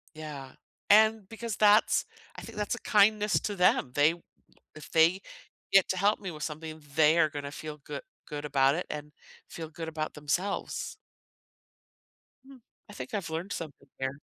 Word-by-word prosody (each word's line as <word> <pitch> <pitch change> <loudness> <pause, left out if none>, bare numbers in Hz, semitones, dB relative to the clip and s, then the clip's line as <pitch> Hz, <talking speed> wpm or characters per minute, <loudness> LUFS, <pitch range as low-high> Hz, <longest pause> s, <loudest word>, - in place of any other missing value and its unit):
Yeah, 150 -4 -8 0.4
and 215 -1 +5
because 225 -1 -5
that's 210 +1 +5 0.3
I - - -8
think - - -10
that's 210 +2 -1
a 240 - -7
kindness 210 0 +4
to 205 - -3
them, 180 -8 +3
they 145 +4 +4 0.6
if 155 - -11
they 165 +4 +4 0.5
get 195 -1 +6
to 185 - 0
help 200 +3 +2
me 195 -3 -5
with 155 -2 -9
something, 155 0 -6
they 155 +2 +5
are 155 -2 +5
gonna 145 -2 -6
feel 150 +1 -7
goo 145 - -7 0.3
good 150 -1 -6
about 140 -1 +3
it 180 - -3
and 150 0 -6 0.4
feel 165 -3 -7
good 160 +1 -7
about 155 -1 -4
themselves. 165 +7 -2 1.5
Hmm, 270 0 -13 0.3
I - - -11
think 205 - -7
I've 195 -6 -3
learned 170 +5 -4
something 145 -3 -7
here. 130 +1 -3
160 Hz, 165 wpm, -29 LUFS, 150-205 Hz, 1.5 s, get